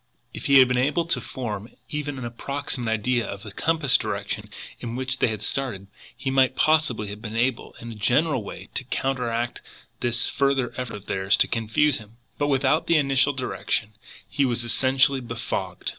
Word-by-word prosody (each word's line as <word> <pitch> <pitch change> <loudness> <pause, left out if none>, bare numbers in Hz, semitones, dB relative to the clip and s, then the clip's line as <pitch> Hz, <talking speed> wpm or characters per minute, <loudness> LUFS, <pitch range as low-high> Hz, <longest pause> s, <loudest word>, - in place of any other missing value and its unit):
If - - -5
he 140 - +7
had 130 -1 +8
been 125 0 +1
able 150 +6 +2
to 170 - 0
form 110 -4 -5
even 145 -2 -3
an 130 - -5
approximate 125 0 -3
idea 120 +2 +1
of 100 0 -7
the 105 - -8
compass 155 +1 +3
direction - - -3 0.3
in 115 0 -5
which 130 +1 -2
they - - +4
had 110 -3 -3
started, 125 -8 -2 0.3
he 135 +1 -2
might 130 -1 +4
possibly 155 -10 +2
have 105 +1 -8
been 110 0 -6
able 120 +1 0
in 115 0 -7
a - - -6
general 125 +5 +2
way 95 -1 -9
to - - -2
counteract 120 -3 -1 0.4
this 120 -1 0
further 135 -3 +1
effort 125 -4 -4
of 105 -1 -10
theirs 95 +1 +1
to - - +4
confuse 115 +6 +1
him; 110 +1 -15 0.2
but 145 - +2
without 140 +2 +2
the 170 - +5
initial 135 -1 +3
direction 120 -4 -2 0.3
he 140 - 0
was 120 -2 0
essentially 130 +3 +3
befogged. 100 -6 -4
125 Hz, 185 wpm, -25 LUFS, 115-135 Hz, 0.4 s, had